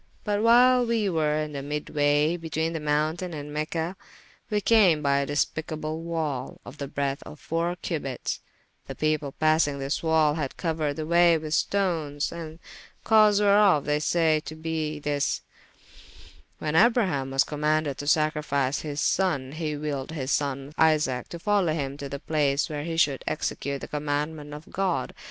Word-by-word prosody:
But 205 -1 0
whyle 245 +2 +6
wee 225 -3 +1
were 155 -3 +1
in 155 0 -2
the 140 -1 -5
mydwaye 145 +2 +1
between 160 0 -2
the 165 - -3
mountayne 155 +4 -1
and 145 0 -7
Mecha, 160 +4 -2 0.5
we 210 - +1
came 190 -8 +4
by 140 0 +3
a 140 - -1
despicable 155 +2 -2
wall, 160 -6 -3
of 150 - -11
the 140 - -4
breadthe 140 0 -2
of 150 - -11
foure 170 +5 -1
cubites: 140 -6 -3 0.5
the - - -6
people 155 -2 0
passyng 155 -2 +3
this 140 +2 -2
wall, 160 -2 +3
had 150 -4 -4
couered 155 -4 -1
the 155 - -4
waye 170 0 +5
with 155 -1 -5
stones, 160 -7 0
the 160 -2 -7 0.5
cause 215 -2 +5
whereof, 200 -6 +4
they 150 0 +1
saye 160 0 +2
to 155 +2 -7
be 160 -1 -3
this: 145 -1 -1 1.2
when 155 0 -3
Abraham 190 - +3
was 135 0 +3
commaunded 150 -1 -1
to 145 - -5
sacrifice 150 -3 +1
his 150 -1 -5
sonne, 160 -8 +1
he 155 0 -3
wylled 145 -1 -4
his 140 -3 -3
sonne 140 0 -1
Isaac 150 -6 +2
to 170 - -6
folowe 185 -3 +1
hym 140 -3 -3
to 140 -1 -6
the 140 - -4
place 145 -1 0
where 145 0 -4
he 165 -1 -3
should 140 -4 +2
execute 140 -2 -3
the - - -6
commaundement 150 +1 -3
of 150 +2 -12
God. 180 -9 -1
155 Hz, 165 wpm, -26 LUFS, 145-165 Hz, 1.2 s, whyle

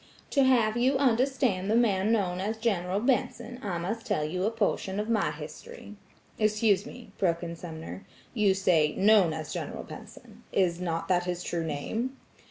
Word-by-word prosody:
"To 275 - +4
have 235 -4 +3
you 260 +3 +3
understand 255 -6 +1
the 220 - +3
man 215 -3 +3
known 185 -5 +1
as 215 +3 -2
General 195 -4 0
Benson, 245 0 -1
I 190 -4 -2
must 210 +7 -3
tell 150 - 0
you 180 +5 -2
a - - +3
portion 205 -3 -1
of 210 +2 -3
my 215 -8 +2
history." 150 +6 -9 0.4
"Excuse 215 -1 +2
me," 240 -5 -11
broke 170 -2 +1
in 170 -1 -5
Sumner, 165 +3 -8 0.3
"you 205 -5 +3
say 165 -6 +2
'known 200 -4 +5
as 155 -1 -5
General - - -5
Benson,' - - -12
is 180 -2 +1
not 165 -2 -2
that 175 -1 +2
his 180 0 -3
true 170 -1 -2
name?" 220 - -3
195 Hz, 175 wpm, -28 LUFS, 175-230 Hz, 0.4 s, known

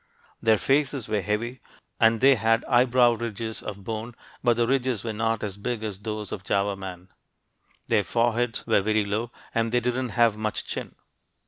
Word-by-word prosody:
Their 110 -1 +4
faces 135 +2 +1
were 105 -2 0
heavy, 110 +6 -2 0.4
and 115 -1 +4
they 135 +1 +7
had 115 -1 +2
eyebrow 125 0 +4
ridges 115 -1 -4
of 100 -2 -7
bone, 115 +3 -5 0.3
but 120 -2 +3
the 120 - +3
ridges 130 -3 0
were 115 -2 -3
not 115 0 -1
as 100 -2 -4
big 110 +2 -3
as 105 -3 -4
those 105 0 -5
of 95 - -5
Java 100 0 0
man. 95 -1 -8 0.8
Their 105 - +3
foreheads 120 +2 0
were - - +3
very 110 +1 +1
low, 110 +4 -2 0.2
and 115 0 0
they 125 - +3
didn't 125 +1 -1
have 115 -3 +5
much 110 0 -3
chin. - - -5
115 Hz, 180 wpm, -26 LUFS, 105-120 Hz, 0.8 s, they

